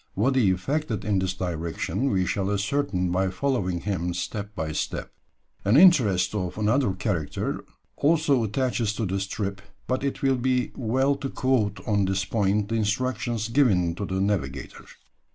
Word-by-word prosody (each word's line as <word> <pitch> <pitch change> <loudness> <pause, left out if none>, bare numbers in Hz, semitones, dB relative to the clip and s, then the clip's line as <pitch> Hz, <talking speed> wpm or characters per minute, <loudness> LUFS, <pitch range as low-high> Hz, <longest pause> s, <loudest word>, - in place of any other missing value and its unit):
What 125 +7 +2
he 120 -7 +4
effected 115 +5 -1
in 100 -2 +2
this 95 0 -1
direction 90 +6 -2
we 95 -2 +1
shall 95 +1 -1
ascertain 100 -3 0
by 95 +1 +1
following 95 -5 -1
him 90 -3 -2
step 105 +3 -4
by 80 -1 -3
step. 75 - -3 0.5
An 105 +6 +4
interest 120 - +5
of 95 -3 -3
another 110 0 +2
character 90 -8 -2 0.3
also 145 -5 +3
attaches 115 -1 0
to 110 +1 -2
this 95 +1 -2
trip, 100 -1 -4 0.2
but 130 +1 -1
it 140 0 -3
will 135 -1 +3
be 125 0 0
well 130 +3 +1
to 135 0 -4
quote 115 -7 0
on 100 -3 +2
this 95 +1 0
point 105 0 0
the 115 - -1
instructions 115 +1 -1
given 110 -10 +3
to 100 +4 -4
the 95 0 -2
navigator. 100 0 -2
105 Hz, 160 wpm, -25 LUFS, 95-130 Hz, 0.5 s, interest